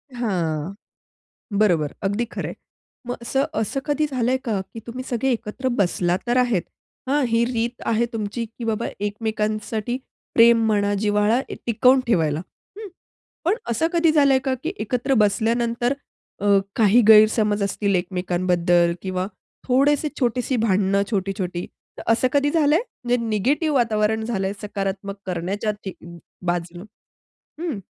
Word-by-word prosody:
हां. 175 -7 -2 0.9
बरोबर. 170 -9 +2
अगदी 205 +4 0
खरंय. - - -4 0.5
मग 245 - -2
असं 270 +4 0 0.2
असं 225 +5 -2
कधी 295 +1 +1
झालंय 255 0 +1
का 215 -5 0
की 225 - -6
तुम्ही 250 +2 -5
सगळे 255 +2 0
एकत्र 235 +2 -3
बसला 180 -2 +1
तर 240 +1 +2
आहेत, 240 -7 +2 0.5
हां? 285 +2 +2
ही 230 0 +2
रीत 235 0 -2
आहे 230 +1 +2
तुमची 225 +1 -3
की 230 +2 -11
बाबा 225 0 -1
एकमेकांसाठी 215 +2 -2 0.4
प्रेम 230 0 +6
म्हणा, 205 -1 +2
जिव्हाळा 210 +3 +2
ए - - -5
टिकवून 250 +3 +4
ठेवायला, 160 -9 +2 0.4
हं? 435 -1 -7 0.6
पण 365 +6 +2
असं 235 +8 +1
कधी 335 -2 +3
झालंय 280 -3 +5
का 265 -2 +1
की 330 - -2
एकत्र 250 +4 0
बसल्यानंतर 235 +4 +1 0.5
अ, - - 0 0.3
काही 225 +1 +5
गैरसमज 215 -1 +6
असतील 200 0 0
एकमेकांबद्दल 175 -1 +1
किंवा 185 -1 -2 0.4
थोडेसे 285 +4 +3
छोटीशी 250 +1 0
भांडणं 200 -2 +2
छोटी-छोटी. 185 -3 -2 0.3
तर - - -6
असं 250 +3 +2
कधी 285 0 +2
झालंय? 305 0 +3 0.3
म्हणजे 245 0 +2
निगेटिव्ह 280 - +1
वातावरण 220 -2 +1
झालंय 195 -4 -1
सकारात्मक 200 -1 -4
करण्याच्या 190 +4 -2
ठी 190 - -4 0.5
बाजूनं? 175 +1 -2 0.8
हं. 330 -10 -3
220 Hz, 135 wpm, -22 LUFS, 195-245 Hz, 0.9 s, प्रेम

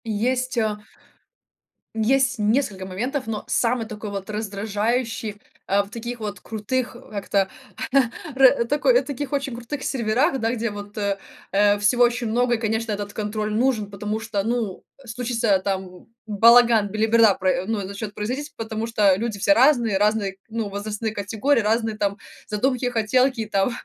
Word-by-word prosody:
Есть, 250 +4 -1
а, 215 -2 0 1.2
есть 260 +3 +2
несколько 210 -3 0
моментов, 245 +9 -3
но 220 -2 -4
самый 235 -1 +1
такой 215 -1 -7
вот 195 0 -6
раздражающий, 215 +1 -2 0.2
а, 200 +1 +2
в 200 - -14
таких 235 +2 -6
вот 205 -3 -5
крутых, 235 +5 -3
а, - - -10
как-то 200 -1 0 0.9
ра 265 -2 +5
такой 300 - +3
таких 285 -1 -5
очень 275 -3 -1
крутых 245 +4 -6
серверах, 250 +1 +1
да, 225 +1 0
где 235 -1 -2
вот, 205 0 -8
э, 200 -1 -1 0.3
э, 205 +1 +4
всего 205 +4 +3
очень 240 0 +2
много 240 +2 +2
и, - - -8
конечно, 225 0 -1
этот 205 0 -4
контроль 210 0 -3
нужен. 225 -3 +1
Потому 210 +2 -3
что, 220 -3 -2
ну, 225 -3 -2 0.2
случится 230 -3 0
там 190 -2 -4 0.2
балаган, 230 0 +5
белиберда 220 0 +4
про 185 -1 0
ну 220 -1 -1
и 195 - -4
начнёт 200 +2 -6
производить, 255 +8 -4
потому 220 0 -4
что 210 -4 +3
люди 220 0 -3
все 250 - +4
разные, 245 -7 +4
разные, 205 -2 +1
ну, 225 -1 -3
возрастные 210 +2 -4
категории, 220 +7 +1
разные 220 +1 0
там 200 -1 -1 0.3
задумки, 250 +4 0
хотелки 250 +2 +2
и - - -5
там 195 +1 +1
220 Hz, 160 wpm, -23 LUFS, 205-245 Hz, 1.2 s, ра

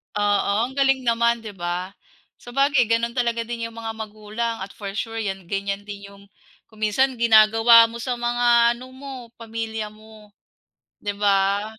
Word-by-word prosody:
Oo, 205 -1 +1
ang 255 +2 -4
galing 270 -1 +2
naman, 235 -1 +1
'di 215 - -7
ba? 175 +2 -3 0.5
Sabagay 275 +1 +1
gano'n 230 +2 0
talaga 235 -1 0
din 230 0 -5
'yong 230 0 -9
mga 225 -1 -5
magulang 215 +2 -4
at 195 +1 -6
for 200 -2 -7
sure 225 +1 -4
'yan 195 -3 -4
ganyan 200 0 -3
din 205 -1 -9
'yong 200 0 -16 0.5
kung 220 - -19
minsan 250 +5 +1
ginagawa 225 0 +6
mo 230 - -8
sa 250 +1 -2
mga 240 0 +3
ano 255 +1 -11
mo, 275 +1 -9 0.2
pamilya 225 -1 -5
mo, 215 0 -16 0.7
'di 205 -1 -4
ba? 200 0 +2
225 Hz, 165 wpm, -23 LUFS, 205-235 Hz, 0.7 s, ginagawa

